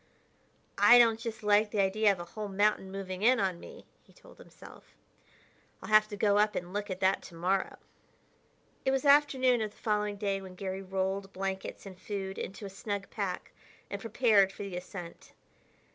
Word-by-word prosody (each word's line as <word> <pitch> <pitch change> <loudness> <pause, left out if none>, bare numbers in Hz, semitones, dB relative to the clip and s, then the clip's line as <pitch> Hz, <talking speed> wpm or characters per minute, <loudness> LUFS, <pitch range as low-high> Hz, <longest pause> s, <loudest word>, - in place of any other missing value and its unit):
"I 245 - +8
don't 230 -2 +5
just 225 -1 -6
like 210 +1 +3
the 210 - -2
idea 200 +2 +3
of 195 - -2
the 175 - -7
whole 210 +3 -6
mountain 200 -1 +1
moving 190 -1 -6
in 250 +3 +4
on 185 -4 -1
me," - - -12 0.2
he - - -24
told - - -18
himself; - - -15 0.8
"I'll - - -9
have 215 0 +6
to 210 -1 -7
go 205 0 +3
up 210 0 +2
and 180 +1 -5
look 205 +1 -3
at 185 0 -5
that 190 0 +2
to 170 - -12
morrow." 185 +3 -1 1.1
It - - +1
was 270 +2 0
afternoon 270 -4 +4
of 215 - -2
the 205 - -24
following 210 -1 -1
day 200 -1 -2
when 185 -1 -11
Garry 190 0 -5
rolled 190 +1 -3
blankets 190 +1 -5
and 190 -2 -11
food 195 -1 -5
into 195 +2 -6
a - - -4
snug 200 0 -5
pack 195 -4 -4 0.4
and - - -5
prepared 220 -4 +3
for 200 - -8
the 195 -2 -6
ascent. 180 -1 -9
200 Hz, 190 wpm, -30 LUFS, 190-215 Hz, 1.1 s, I